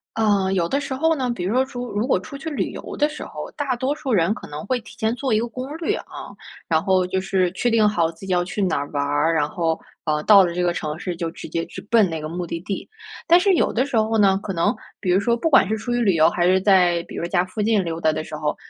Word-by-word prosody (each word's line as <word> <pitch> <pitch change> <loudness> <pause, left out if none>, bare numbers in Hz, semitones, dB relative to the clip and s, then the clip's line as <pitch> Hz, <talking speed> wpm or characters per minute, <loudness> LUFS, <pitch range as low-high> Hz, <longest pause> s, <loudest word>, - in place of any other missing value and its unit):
呃， 205 -4 +2
有 170 -3 0
的 280 - +1
时 280 - -4
候 320 +5 +2
呢， 255 -4 -1
比 185 -7 -4
如 205 +7 -1
说 260 - +3
出 245 -2 -6
如 210 +4 -1
果 260 - +2
出 275 +9 -9
去 315 - -9
旅 300 -3 -1
游 - - -8
的 295 +1 +2
时 305 - -7
候， - - -7
大 280 -4 -1
多 260 +4 -1
数 270 -4 -3
人 175 -2 +3
可 - - -10
能 150 +1 -7
会 255 +2 0
提 225 - -14
前 220 +1 0
做 255 -1 -1
一 215 - +3
个 235 - -2
攻 255 +5 -6
略 330 - -1
啊， - - -9 0.4
然 160 -1 +1
后 185 -2 +2
就 190 +1 -1
是 185 -1 0
确 240 - -1
定 225 -2 +4
好 170 -5 +1
自 165 - -22
己 - - -3
要 175 -1 +2
去 195 +3 -4
哪 185 -4 +1
儿 140 0 -3
玩 145 -1 -1
儿。 145 +3 +1
然 150 -2 +1
后， 165 -1 -1 0.3
呃， 150 -1 0
到 200 0 +7
了 170 - -3
这 180 - -2
个 175 -1 +2
城 155 -3 -4
市 180 -1 -4
就 165 -1 -3
直 - - -9
接 165 0 -2
去 - - -9
奔 225 -4 +5
那 160 -2 -4
个 155 - -5
目 175 +2 -4
的 165 0 -4
地。 190 +3 -5 0.4
但 345 +1 +7
是 385 0 +3
有 - - +1
的 255 +4 +1
时 265 -5 -1
候 220 +1 +1
呢， 195 -3 +4
可 195 - -4
能 185 +7 +1 0.2
比 190 - -3
如 180 +2 +4
说 235 +4 +1
不 325 +8 -1
管 265 -10 +5
是 215 - 0
出 240 - -4
于 240 - +1
旅 205 -6 +3
游， 160 -1 +5
还 175 - 0
是 185 +1 +3
在 180 -3 +4
比 - - -9
如 - - -3
家 175 0 +1
附 185 +4 -9
近 215 -3 +2
溜 165 -1 -4
达 155 -2 +2
的 - - -3
时 155 - -8
候， 150 0 -2
195 Hz, 320 characters per minute, -22 LUFS, 170-240 Hz, 0.4 s, 到